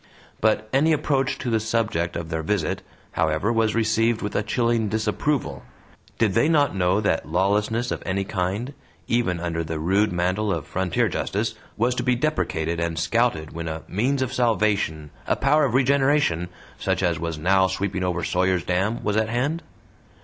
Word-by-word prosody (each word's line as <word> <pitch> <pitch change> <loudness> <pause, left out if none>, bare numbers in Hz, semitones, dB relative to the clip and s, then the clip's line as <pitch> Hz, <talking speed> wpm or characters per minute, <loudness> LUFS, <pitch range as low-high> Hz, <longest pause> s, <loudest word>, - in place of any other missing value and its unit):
But 110 0 +2
any 155 +4 +4
approach 135 -3 0
to 125 - -3
the 110 - +2
subject 110 -6 -1
of 85 -1 -4
their 80 -1 -2
visit, 90 -1 -1 0.3
however, 80 +9 +1
was 110 -1 +1
received 115 0 +1
with 105 - -4
a - - +2
chilling 115 0 0
dissapproval. 110 - -1 0.6
Did 110 -4 +2
they 150 - +3
not 145 -8 +3
know 95 +2 +2
that 80 -7 0
lawlessness 105 +7 +1
of - - -3
any 95 +1 -1
kind, 100 +7 -2 0.3
even 115 -8 +1
under 85 -1 -2
the 80 0 -4
rude 95 +6 +2
mantle 95 +4 0
of - - -2
frontier 95 -2 0
justice, - - -2 0.2
was 120 +3 +2
to 125 - -2
be 125 0 +2
deprecated 85 - -1
and 85 -1 -2
scouted 80 -3 0
when 85 0 -5
a 80 0 -5
"means 130 +8 0
of 130 0 -4
salvation, 105 - +1 0.2
a - - +2
power 150 +2 +3
of 130 - -1
regeneration," 135 - +2 0.3
such - - 0
as 85 -3 +1
was 85 -1 -3
now 95 +4 +3
sweeping 95 0 -2
over 90 -1 -1
Sawyer's 90 +1 +1
Dam, 95 +6 -1
was 105 0 0
at 110 0 +1
hand? 140 +8 -1
105 Hz, 175 wpm, -24 LUFS, 85-120 Hz, 0.6 s, any